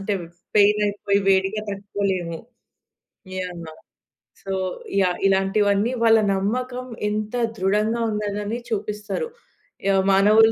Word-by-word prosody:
అంటే, 200 Hz, +1 st, -1 dB, 0.4 s
పెయినయిపోయి 205 Hz, -1 st, +3 dB
వేడిగా 195 Hz, +2 st, +2 dB
తట్టుకోలేము. 195 Hz, -4 st, -2 dB, 1.0 s
యాహ్! 180 Hz, -2 st, -5 dB, 0.8 s
So 195 Hz, 0 st, -3 dB, 0.5 s
yeah! 180 Hz, -2 st, +1 dB
ఇలాంటివన్నీ 200 Hz, +3 st, +2 dB
వాళ్ళ 225 Hz, 0 st, +7 dB, 0.2 s
నమ్మకం 250 Hz, +6 st, -2 dB, 0.2 s
ఎంత 215 Hz, +2 st, -3 dB, 0.2 s
ధృడంగా 210 Hz, +5 st, +1 dB
ఉందనని 210 Hz, +1 st, -2 dB
చూపిస్తారు. 210 Hz, -, -3 dB, 0.6 s
యాహ్! 195 Hz, -1 st, +4 dB
మానవులు 210 Hz, +3 st, +6 dB
205 Hz, 90 wpm, -23 LUFS, 195-215 Hz, 1.0 s, వాళ్ళ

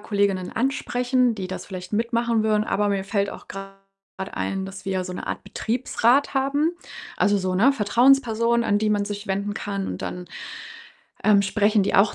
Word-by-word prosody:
Kolleginnen 200 Hz, -3 st, 0 dB
ansprechen, 250 Hz, -1 st, +1 dB
die 190 Hz, -3 st, -5 dB
das 185 Hz, -, -6 dB
vielleicht 185 Hz, -1 st, -8 dB
mitmachen 230 Hz, 0 st, +1 dB
würden, 215 Hz, -1 st, +2 dB
aber 205 Hz, 0 st, 0 dB
mir 195 Hz, -1 st, 0 dB
fällt 200 Hz, 0 st, 0 dB
auch -, -, -11 dB
grad 195 Hz, 0 st, -8 dB, 0.6 s
ein, 195 Hz, 0 st, -2 dB
dass 195 Hz, 0 st, -9 dB
wir 195 Hz, -, -2 dB
ja 185 Hz, -1 st, -1 dB
so 180 Hz, -, -6 dB
'ne 180 Hz, -, -6 dB
Art -, -, -4 dB
Betriebsrat 240 Hz, +6 st, +1 dB
haben. 285 Hz, +4 st, +1 dB, 0.4 s
Also, 205 Hz, 0 st, +3 dB
so, 185 Hz, -1 st, -1 dB
ne, 235 Hz, +9 st, +5 dB
Vertrauensperson, 235 Hz, 0 st, +3 dB
an 205 Hz, -2 st, +2 dB
die 215 Hz, 0 st, +1 dB
man 205 Hz, -1 st, +1 dB
sich 205 Hz, +1 st, -6 dB
wenden 200 Hz, +1 st, -2 dB
kann, 200 Hz, -2 st, -3 dB
und -, -, -5 dB
dann, 180 Hz, 0 st, -5 dB, 1.0 s
ähm, 205 Hz, -2 st, +5 dB
sprechen 210 Hz, +1 st, +2 dB
die -, -, -1 dB
auch 200 Hz, +2 st, +4 dB
205 Hz, 185 wpm, -24 LUFS, 195-235 Hz, 1.0 s, ne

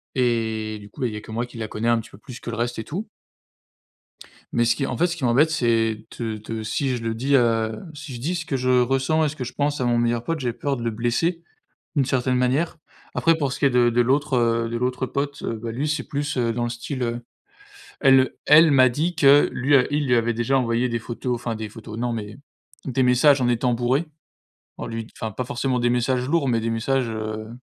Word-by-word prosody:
et 110 Hz, -3 st, 0 dB
du 100 Hz, 0 st, -13 dB
coup, 130 Hz, -, -12 dB
bah 125 Hz, -, +2 dB
il 110 Hz, -, -5 dB
y 105 Hz, -, -5 dB
a -, -, -7 dB
que 110 Hz, -, -11 dB
moi 120 Hz, +2 st, -2 dB
qui 120 Hz, -1 st, -13 dB
la 110 Hz, -1 st, -4 dB
connais 115 Hz, +3 st, -2 dB
un 115 Hz, -1 st, +3 dB
petit 110 Hz, -, -9 dB
peu -, -, -13 dB
plus 125 Hz, +3 st, -11 dB
que -, -, -7 dB
le 115 Hz, -, -4 dB
reste 120 Hz, 0 st, -2 dB
et -, -, -3 dB
tout. 195 Hz, -, -5 dB, 1.5 s
Mais 120 Hz, -, +3 dB
ce 115 Hz, -, +3 dB
qui 135 Hz, -, -1 dB
en -, -, -3 dB
fait, 175 Hz, -, +2 dB
ce 175 Hz, 0 st, -4 dB
qui 135 Hz, -, -2 dB
m'embête, 135 Hz, +7 st, +4 dB
c'est 115 Hz, -6 st, +1 dB
de 110 Hz, -2 st, -3 dB
de 110 Hz, +1 st, -6 dB
si 125 Hz, +4 st, -1 dB
je 115 Hz, -, -6 dB
le 115 Hz, -, -1 dB
dis, 135 Hz, +5 st, +1 dB
heu 115 Hz, -3 st, +2 dB
si 145 Hz, -2 st, -8 dB
je -, -, -7 dB
dis 170 Hz, +6 st, -1 dB
ce 170 Hz, -2 st, -4 dB
que 140 Hz, -, -2 dB
je 130 Hz, 0 st, -1 dB
ressens 135 Hz, +5 st, +1 dB
et 150 Hz, -, +1 dB
ce 155 Hz, -, -8 dB
que 130 Hz, -, -4 dB
je 125 Hz, -, -6 dB
pense 145 Hz, -1 st, -1 dB
à -, -, +1 dB
mon 120 Hz, -1 st, +2 dB
meilleur 120 Hz, 0 st, +1 dB
pote, 165 Hz, +2 st, -2 dB
j'ai 120 Hz, -3 st, -2 dB
peur 135 Hz, +3 st, -2 dB
de 120 Hz, -, -6 dB
le 115 Hz, -, 0 dB
blesser, 120 Hz, +10 st, -1 dB, 0.5 s
d'une 135 Hz, -, +3 dB
certaine 130 Hz, 0 st, 0 dB
manière. 135 Hz, +7 st, +1 dB, 0.4 s
Après 165 Hz, 0 st, +3 dB
pour 140 Hz, -5 st, -1 dB
ce -, -, -5 dB
qui -, -, 0 dB
est 140 Hz, -, +5 dB
de 125 Hz, -1 st, +4 dB
de 120 Hz, +1 st, +2 dB
l'autre, 135 Hz, +2 st, +1 dB
heu 115 Hz, -1 st, +1 dB
de 115 Hz, -, -3 dB
l'autre 125 Hz, +1 st, -1 dB
pote, 140 Hz, +3 st, -3 dB
heu, 115 Hz, -, -3 dB
bah 115 Hz, +1 st, -5 dB
lui 140 Hz, +6 st, -2 dB
c'est 150 Hz, -2 st, -1 dB
plus, 145 Hz, 0 st, -3 dB
heu, 115 Hz, -2 st, +1 dB
dans 120 Hz, +1 st, -2 dB
le -, -, -1 dB
style, 120 Hz, +3 st, -5 dB
heu, 120 Hz, 0 st, -3 dB, 0.8 s
elle 135 Hz, -2 st, +5 dB
elle 155 Hz, +1 st, +7 dB
m'a 130 Hz, -2 st, +6 dB
dit 160 Hz, +7 st, -1 dB
que 145 Hz, -1 st, +6 dB
lui, 135 Hz, +4 st, 0 dB
heu 130 Hz, -3 st, +5 dB
il 145 Hz, 0 st, 0 dB
lui 125 Hz, -, +4 dB
avait 120 Hz, 0 st, +1 dB
déjà 120 Hz, +4 st, +1 dB
envoyé 120 Hz, +1 st, 0 dB
des 115 Hz, -, -1 dB
photos, 120 Hz, +2 st, -4 dB
enfin 120 Hz, -1 st, -3 dB
des 110 Hz, -1 st, -5 dB
photos, 110 Hz, 0 st, -9 dB
non, 120 Hz, +1 st, -1 dB
mais 105 Hz, -2 st, -5 dB, 0.5 s
des 130 Hz, -1 st, 0 dB
messages 125 Hz, +3 st, +5 dB
en 125 Hz, -, +2 dB
étant 120 Hz, +1 st, +1 dB
bourré, 125 Hz, +6 st, +1 dB, 0.7 s
en -, -, -5 dB
lui 115 Hz, 0 st, -4 dB
d -, -, -19 dB
enfin 110 Hz, -1 st, -3 dB
pas 125 Hz, -, -4 dB
forcément 125 Hz, 0 st, -1 dB
des 120 Hz, 0 st, +2 dB
messages 125 Hz, +1 st, +1 dB
lourds, 160 Hz, -2 st, +1 dB
mais 115 Hz, -3 st, +1 dB
des 115 Hz, -, -1 dB
messages, 115 Hz, +2 st, 0 dB
heu, 110 Hz, 0 st, -4 dB
125 Hz, 260 wpm, -23 LUFS, 115-135 Hz, 1.5 s, elle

